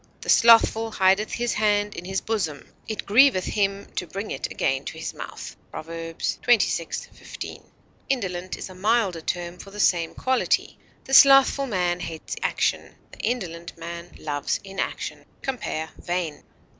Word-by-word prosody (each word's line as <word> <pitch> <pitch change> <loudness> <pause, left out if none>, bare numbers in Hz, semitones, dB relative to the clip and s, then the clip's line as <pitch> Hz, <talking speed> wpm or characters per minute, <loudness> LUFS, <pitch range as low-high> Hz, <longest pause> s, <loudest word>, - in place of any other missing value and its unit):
"The - - -7
slothful 225 -1 +6
hideth 195 0 +2
his 240 0 0
hand 205 -1 +1
in 175 - -7
his 190 +1 -2
bosom; 180 -10 -3
it 215 -2 -4
grieveth 230 -3 +5
him 200 -1 0
to 180 - -2
bring 200 +5 -5
it - - -3
again 135 0 0
to - - -5
his - - -5
mouth," - - -8
Prov. - - -7
xxvi, 165 +3 0
15. - - -9 0.4
Indolent 185 -8 -2
is - - -6
a 185 - -11
milder 200 -3 +1
term 175 +2 -4
for 200 - -10
the 205 +1 -10
same 170 -4 +2
quality; 260 0 0 0.2
the 270 - -7
slothful 275 0 +7
man 180 -5 0
hates 165 -2 -6
action; - - 0 0.2
the - - -14
indolent 170 -9 -3
man 170 +1 -8
loves 145 -2 -2
inaction. 195 0 -4 0.2
Compare 195 - -3
VAIN. 175 -4 -3
190 Hz, 150 wpm, -25 LUFS, 170-225 Hz, 0.4 s, slothful